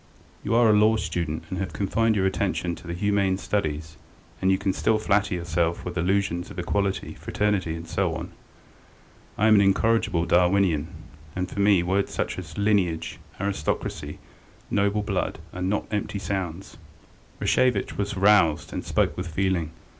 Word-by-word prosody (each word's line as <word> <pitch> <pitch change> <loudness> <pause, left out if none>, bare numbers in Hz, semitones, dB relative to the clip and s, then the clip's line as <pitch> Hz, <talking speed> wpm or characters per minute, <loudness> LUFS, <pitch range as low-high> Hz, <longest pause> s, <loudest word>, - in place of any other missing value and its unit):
You 115 - 0
are 120 0 +5
a 110 - +5
law 105 +1 +5
student 85 -7 -2
and 95 - -3
have 95 -2 -3
confined 110 +3 +1
your 95 -2 +1
attention 95 -2 -1
to 85 - -11
the 85 - -4
humane 100 0 +1
studies, 75 -7 -3 0.4
and 95 - +2
you 95 - +3
can 100 -1 -1
still 110 +3 +2
flatter 100 -2 +1
yourself 85 -1 -1
with 90 - -5
illusions 90 0 0
of - - -11
equality, 95 +2 -1
fraternity, 100 -6 -1
and 85 0 -8
so - - 0
on; - - -6 1.1
I 105 - +2
am 110 - +6
an 100 - +6
incorrigible 100 -3 +2
Darwinian, 90 -2 +3 0.5
and 90 0 -2
for - - -5
me 100 -3 +4
words 95 +3 0
such - - -2
as 80 -4 -9
lineage, 100 -6 0 0.2
aristocracy, 95 -6 -3 0.5
noble 100 +1 +1
blood, - - -2 0.2
are 90 - -6
not 95 +3 0
empty 105 -1 -2
sounds." 95 -2 -4 0.6
Rashevitch 125 -6 +1
was 100 -1 -3
roused 90 -6 +3
and - - -3
spoke - - +1
with 90 0 -4
feeling. 85 -1 0
95 Hz, 160 wpm, -25 LUFS, 85-100 Hz, 1.1 s, am